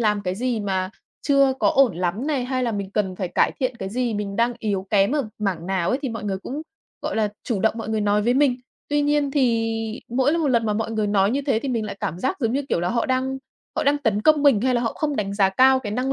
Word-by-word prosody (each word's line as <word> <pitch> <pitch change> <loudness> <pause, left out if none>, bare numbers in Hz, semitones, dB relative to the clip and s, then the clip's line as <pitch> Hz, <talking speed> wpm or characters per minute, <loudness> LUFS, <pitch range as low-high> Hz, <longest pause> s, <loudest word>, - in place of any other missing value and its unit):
làm 210 -2 +2
cái 185 -1 -2
gì 240 0 -1
mà 190 -2 -1 0.3
chưa 275 -2 +4
có - - +4
ổn 255 -10 +3
lắm 185 - -2
này, 275 -5 0
hay 255 0 -1
là 235 - 0
mình 200 -2 -4
cần 195 -3 -1
phải 185 -3 -3
cải - - +2
thiện 255 -2 -1
cái 190 - -5
gì, 240 +1 -1
mình 200 -1 -4
đang 235 +1 +2
yếu 200 -4 -2
kém 200 +4 +3
ở 280 -7 0
mảng 185 -5 -2
nào 190 -3 0
ấy, 260 - +1
thì 270 - -1
mọi 225 -2 -5
người 195 -2 -2
cũng, 280 +9 -6 0.4
gọi - - -3
là, 215 -1 +2
chủ 220 -6 -2
động 220 0 +2
mọi 225 - -5
người 220 -1 0
nói 205 0 +2
với 240 +3 +2
mình. 270 -3 +3 0.3
Tuy 290 0 +1
nhiên 290 -1 +1
thì 230 -5 +1 0.4
mỗi 265 +7 +1
một 305 -4 +1
lần 230 -3 +2
mà 210 - +1
mọi 220 +1 -2
người 215 -2 0
nói 200 0 +2
như 280 +3 -1
thế 245 -5 +2
thì 275 - -5
mình 230 -4 -1
lại 205 - -6
cảm 170 - -3
giác 260 +7 -1
giống 230 -1 +1
như 280 +2 0
kiểu 170 - +1
là 175 - 0
họ 235 +2 0
đang 260 +1 -1 0.4
họ - - +1
đang 285 +1 +2
tấn 220 -6 0
công 305 +1 +4
mình 270 -8 +5
hay 255 0 +1
là 240 - +2
họ 230 - -1
không 295 -3 -2
đánh 200 -1 -2
giá 195 -2 +4
cao 260 +6 +5
cái 210 -4 -5
năng 255 +3 -1
230 Hz, 285 wpm, -23 LUFS, 205-265 Hz, 0.4 s, mình